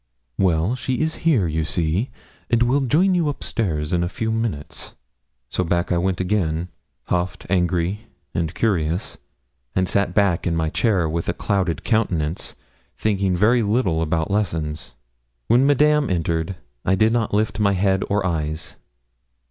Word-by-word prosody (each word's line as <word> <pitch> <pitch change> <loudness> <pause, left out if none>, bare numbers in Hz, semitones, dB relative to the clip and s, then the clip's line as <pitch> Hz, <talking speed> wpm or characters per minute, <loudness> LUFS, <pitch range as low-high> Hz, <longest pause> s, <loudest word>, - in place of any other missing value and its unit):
'Well, 90 +3 +2
she 130 +1 -2
is 155 +4 -1
here, 125 - +4
you 80 0 -1
see, 85 - 0 0.4
and 120 -1 +3
will 130 +4 +3
join 165 +9 +3
you 170 -4 +2
up 145 - -2
stairs 80 -10 -1
in 85 0 +2
a 85 - -1
few 110 +3 -2
minutes.' 110 -10 -3 0.5
So - - -1
back 85 +1 0
I 85 - +2
went 95 0 0
again, 90 -3 0 0.3
huffed, 90 +1 -2
angry, 90 +4 0 0.3
and 80 -2 -1
curious, 90 -3 0 0.6
and 95 0 +2
sat 100 -2 0
back 100 -5 +2
in 85 - 0
my 80 -1 0
chair 100 -8 +2
with 85 +2 -2
a - - +1
clouded 95 -4 -1
countenance, 90 -9 0 0.4
thinking 100 -3 +1
very 115 +6 +4
little 100 -6 +1
about 80 +1 0
lessons. 80 - -2 0.5
When 125 - +4
Madame 150 +1 +4
entered, 85 +1 -1 0.3
I 95 - +2
did 110 +4 +3
not 115 -3 0
lift 105 0 0
my 100 -1 +3
head 95 0 +2
or 100 -1 +1
eyes. 80 -2 -3
95 Hz, 155 wpm, -22 LUFS, 85-110 Hz, 0.6 s, here